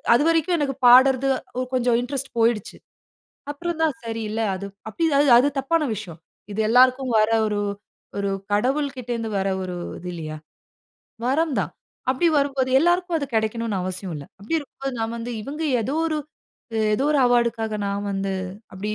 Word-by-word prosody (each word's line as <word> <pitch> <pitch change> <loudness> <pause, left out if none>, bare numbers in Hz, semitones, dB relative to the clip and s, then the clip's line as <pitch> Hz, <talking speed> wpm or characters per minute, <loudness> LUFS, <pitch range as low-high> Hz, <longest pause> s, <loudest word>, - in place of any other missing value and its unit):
அதுவரைக்கும் 330 +5 +2
எனக்கு 275 -2 -1
பாடுறது, 260 +2 +7 0.3
ஒரு 255 0 -1
அ - - -32
கொஞ்சம் 245 -2 +2
இன்ட்ரெஸ்ட் 270 +2 -4
போயிடுச்சு. 225 -3 +1 0.7
அப்புறம் 340 +3 -4
தான், 310 -5 +1
'சரி, 225 -1 -4
இல்ல 225 +1 -1
அது 200 +1 -6 0.2
அப்டி, 330 - 0
அது 285 -1 +4
அது 275 +3 +3
தப்பான 315 +4 +1
விஷயம். 175 -5 -8 0.3
இது 215 - 0
எல்லோருக்கும் 255 +1 +4
வர 215 +1 +3 0.2
ஒரு, 210 -1 -1 0.6
ஒரு 200 0 -1 0.2
கடவுள் 275 +6 +1
கிட்ட 245 -1 -8
இருந்து 225 -1 -4
வர 195 - 0 0.2
ஒரு 180 -1 -5 0.2
இது 180 - -7
இல்லையா? 155 -2 -6 0.9
வரம் 295 +2 +1
தான்.' - - -4 0.4
அப்படி 265 +6 +1
வரும்போது, 275 -2 0
எல்லோருக்கும் 350 +2 +2
அது 285 - -3
கிடைக்கணும்னு 220 -1 0
அவசியம் 185 0 -3
இல்ல. 145 - -8
அப்படி 205 +11 -4
இருக்கும் 290 -4 -12
போது 270 - -1
நான் 225 +1 -2
வந்து 235 +1 -5
இவங்க 295 +8 -5 0.2
ஏதோ 265 +6 -2
ஒரு 315 -1 -1 0.8
ஏதோ 260 - 0
ஒரு 300 - +3
அவார்டுக்காக 235 -2 +1
நான் 200 +1 -2
வந்து 195 0 -2 0.4
அப்படி 195 +3 -4
245 Hz, 170 wpm, -23 LUFS, 210-280 Hz, 0.9 s, பாடுறது